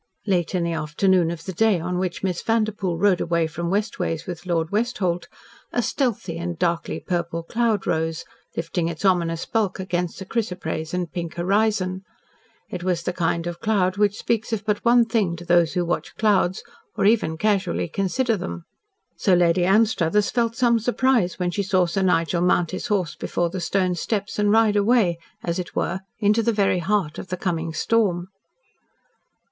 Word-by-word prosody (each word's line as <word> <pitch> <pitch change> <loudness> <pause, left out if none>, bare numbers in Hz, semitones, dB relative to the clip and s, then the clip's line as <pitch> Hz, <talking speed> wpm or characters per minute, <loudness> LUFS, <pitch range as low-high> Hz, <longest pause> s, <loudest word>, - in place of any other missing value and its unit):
Late 185 -3 0
in 175 - +1
the 170 0 -1
afternoon 165 +3 +2
of 165 -1 -5
the 190 - -4
day 215 0 +3
on 180 +2 -2
which 180 -1 -3
Miss 180 -3 -1
Vanderpoel 215 -6 0
rode 185 0 +3
away 170 -1 +1
from 170 +2 -4
West 205 +4 -1
Ways 165 0 -2
with 180 0 -7
Lord 165 -2 0
Westholt, 205 -5 -1 0.4
a - - 0
stealthy 210 - -1
and 170 0 -4
darkly 170 -1 -1
purple 170 -2 -2
cloud 225 +2 0
rose, 160 0 -1 0.3
lifting 165 +1 -1
its 170 +3 -4
ominous 170 -3 +1
bulk 215 -5 -1
against 180 -2 -2
a 190 - -6
chrysoprase 180 -7 -3
and 180 -2 -2
pink 170 -3 -5
horizon. 190 0 +1 0.7
It 180 -1 -6
was 180 -2 0
the 180 - -2
kind 170 -1 -1
of 175 0 -5
cloud 200 -4 +1
which 205 0 +2
speaks 230 0 -1
of 215 -2 -2
but 210 -2 0
one 235 0 +5
thing 215 -7 0
to 175 +1 -10
those 170 -2 +3
who 180 -1 0
watch 175 - -3
clouds, 195 -4 +2 0.3
or - - +2
even 205 -7 +2
casually 200 -3 0
consider 215 +7 0
them. 175 -3 -6 0.5
So 190 - +3
Lady 175 0 +3
Anstruthers 210 -1 +3
felt 230 -2 0
some 240 -2 +3
surprise 245 -4 +1
when 180 -1 -1
she 200 - -1
saw 185 -2 +2
Sir 185 +3 -1
Nigel 170 -2 +2
mount 175 -1 +2
his 185 +5 -4
horse 195 -7 0
before 170 -1 -2
the 185 0 -4
stone 185 +1 +1
steps 205 +4 -3
and 205 0 +3
ride 220 -1 +4
away, 205 -5 +3 0.2
as 170 +1 -2
it 180 - -6
were, 180 +2 -1 0.2
into 210 +1 +3
the 230 +1 +2
very 200 -4 +2
heart 180 -3 -1
of - - -7
the 185 0 -4
coming 165 -3 -2
storm. 180 0 +1
185 Hz, 185 wpm, -23 LUFS, 170-210 Hz, 0.7 s, one